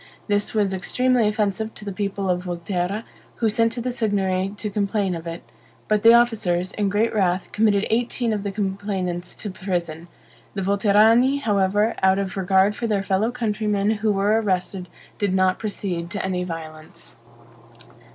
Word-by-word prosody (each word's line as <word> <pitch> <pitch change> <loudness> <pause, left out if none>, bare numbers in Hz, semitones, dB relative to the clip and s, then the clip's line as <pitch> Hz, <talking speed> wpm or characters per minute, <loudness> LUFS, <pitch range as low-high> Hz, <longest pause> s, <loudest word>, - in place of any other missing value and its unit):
This 205 +1 0
was 205 -3 +1
extremely 245 +5 +1
offensive 210 +1 -1
to 210 - -8
the 200 - -3
people 200 0 -3
of 180 0 -1
Volterra, 180 +4 -2 0.3
who 230 - 0
sent 230 +2 +2
to 240 - -4
the 250 +1 -2
Signory 195 -5 0
to 210 0 -4
complain 200 -1 0
of 165 0 -6
it; 165 +1 -6 0.4
but 210 -1 +2
the 230 - +8
officers, 200 -7 +2
in 205 -2 -1
great 210 +4 +1
wrath, 185 -3 0
committed 210 -2 +2
eighteen 235 0 0
of 210 - -2
the 200 0 -3
complainants 190 -3 -3
to 210 - -5
prison. 175 -3 -4 0.5
The 195 - -2
Volterrani, 215 +7 +4
however, 205 0 +2
out 190 0 +4
of 195 -1 -3
regard 190 +2 +2
for 235 - -3
their 205 -3 0
fellow 195 +3 +1
countrymen 210 -4 0
who 215 -1 +2
were 205 +3 +2
arrested, 185 -2 -2 0.3
did 200 -2 +1
not 185 0 +2
proceed 185 -5 -3
to 195 +2 -3
any 180 -1 -1
violence. 165 -2 -8
200 Hz, 165 wpm, -23 LUFS, 185-215 Hz, 0.5 s, the